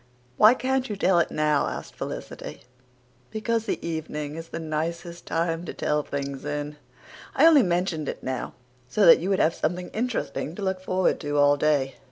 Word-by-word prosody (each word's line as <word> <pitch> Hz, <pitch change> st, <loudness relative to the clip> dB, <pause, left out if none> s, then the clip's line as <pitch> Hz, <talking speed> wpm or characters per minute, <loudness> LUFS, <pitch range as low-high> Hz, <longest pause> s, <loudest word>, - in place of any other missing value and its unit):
"Why 215 Hz, -, +7 dB
can't 265 Hz, 0 st, -1 dB
you 210 Hz, -, -2 dB
tell 190 Hz, -2 st, +3 dB
it 170 Hz, -, +1 dB
now?" 150 Hz, -1 st, +1 dB
asked -, -, -6 dB
Felicity. -, -, -7 dB, 0.7 s
"Because 225 Hz, +1 st, -2 dB
the -, -, 0 dB
evening 150 Hz, -2 st, -4 dB
is 165 Hz, 0 st, -7 dB
the -, -, -6 dB
nicest 170 Hz, +2 st, -4 dB
time 165 Hz, 0 st, -1 dB
to -, -, -7 dB
tell 150 Hz, 0 st, 0 dB
things 140 Hz, -1 st, -5 dB
in. 145 Hz, 0 st, -4 dB, 0.6 s
I 295 Hz, -, +5 dB
only 320 Hz, -4 st, +8 dB
mentioned 175 Hz, -, 0 dB
it -, -, -6 dB
now 130 Hz, -1 st, -4 dB, 0.4 s
so 205 Hz, +8 st, +3 dB
that 165 Hz, -, +9 dB
you 180 Hz, -, -3 dB
would 195 Hz, -, +2 dB
have 165 Hz, -, +3 dB
something 180 Hz, +3 st, -2 dB
interesting 220 Hz, -8 st, -3 dB
to 205 Hz, -, -6 dB
look 190 Hz, -1 st, -1 dB
forward 185 Hz, 0 st, +1 dB
to 145 Hz, -2 st, -2 dB
all 145 Hz, 0 st, +5 dB
day." 145 Hz, -2 st, +1 dB
165 Hz, 185 wpm, -25 LUFS, 150-190 Hz, 0.7 s, that